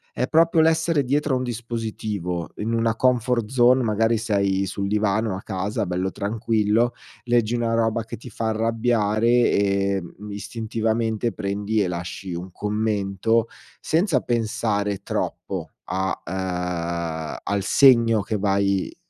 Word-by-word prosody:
è 125 - 0
proprio 165 +1 +4
l'essere 160 -1 +2
dietro 145 +2 0
a - - +3
un 125 - -2
dispositivo, 110 -7 -4
in 110 +2 -2
una 115 -1 +1
comfort 125 -2 +1
zone, 125 +1 +4
magari 115 0 +2
sei 100 -3 0
sul 100 +1 -3
divano 105 0 +1
a 95 - -6
casa 100 +1 -2
bello 90 +1 -1
tranquillo, 110 +2 +1 0.3
leggi 120 -1 +1
una 115 -1 0
roba 115 0 +1
che 110 - -7
ti 120 - -11
fa 110 +1 -2
arrabbiare 110 -1 +1
e, 100 -5 +3
mhmm, 100 +4 -11
istintivamente 110 +2 -2
prendi 105 +2 -1
e 95 - +1
lasci 90 +1 -5
un 90 +2 -6
commento, 105 +2 0 0.3
senza 160 -4 +2
pensare 105 -4 -1
troppo - - -4
a, 95 +2 -2
ehm, 85 -3 -3
al 100 -1 0
segno 115 -2 +5
che 105 +2 -2
vai 100 -1 0
110 Hz, 135 wpm, -23 LUFS, 100-115 Hz, 0.3 s, segno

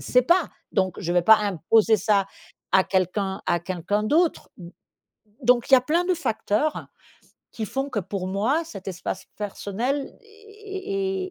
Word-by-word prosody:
sais 250 - +3
pas. 345 +5 +2 0.2
Donc, 185 -2 0
je 175 - -2
vais 175 - +4
pas 220 +5 +8
imposer 210 +3 +2
ça 200 0 +2 0.5
à 190 - +5
quelqu'un 190 +1 -1
à 175 - +2
quelqu'un 185 +4 -2
d'autre. 320 +9 +1
M 175 -2 -10 0.7
donc 240 0 +3
il 270 - +3
y - - +11
a - - +1
plein 330 +7 +1
de 365 0 +1
facteurs, 295 -2 -1 0.7
qui 220 - -4
font 270 +5 -3
que 220 - -2
pour 185 0 -5
moi, 225 - 0
cet 200 - -9
espace 175 -2 -5
personnel 210 +5 -2
e 275 - -8
e 400 -3 -5
220 Hz, 165 wpm, -24 LUFS, -, 0.7 s, y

